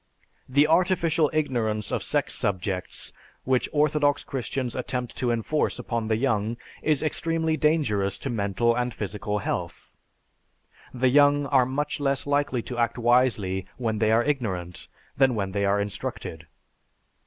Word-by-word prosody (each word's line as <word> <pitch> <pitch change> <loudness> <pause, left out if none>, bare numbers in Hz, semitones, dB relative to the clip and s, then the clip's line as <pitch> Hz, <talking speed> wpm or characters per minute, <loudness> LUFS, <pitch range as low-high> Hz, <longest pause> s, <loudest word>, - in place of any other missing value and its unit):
The 140 +3 +4
artificial 165 -2 +3
ignorance 120 -9 -1
of - - -1
sex - - 0
subjects 95 -1 -3 0.3
which 130 -1 +1
orthodox 150 -1 +2
Christians 130 -1 -3
attempt 125 -1 -3
to 125 - 0
enforce 120 +6 0
upon 115 -2 -3
the 110 - +2
young 115 -2 0 0.2
is 155 -2 +1
extremely 160 +1 0
dangerous 135 -12 +1
to 135 - -4
mental 115 +2 +1
and 125 -1 -2
physical 105 0 -3
health. - - -4 1.0
The 130 +1 +2
young 145 +1 +5
are 135 -3 +3
much 145 +3 -2
less 135 -1 0
likely 145 -4 0
to 120 -1 -5
act 115 +1 +1
wisely 120 -6 +2
when 110 -4 -1
they 110 0 +3
are 115 +2 +4
ignorant, 95 -12 -3 0.3
than 130 -3 +4
when 100 -3 -2
they 100 +1 0
are 100 +1 +2
instructed. 80 -5 -5
125 Hz, 140 wpm, -26 LUFS, 105-145 Hz, 1.0 s, young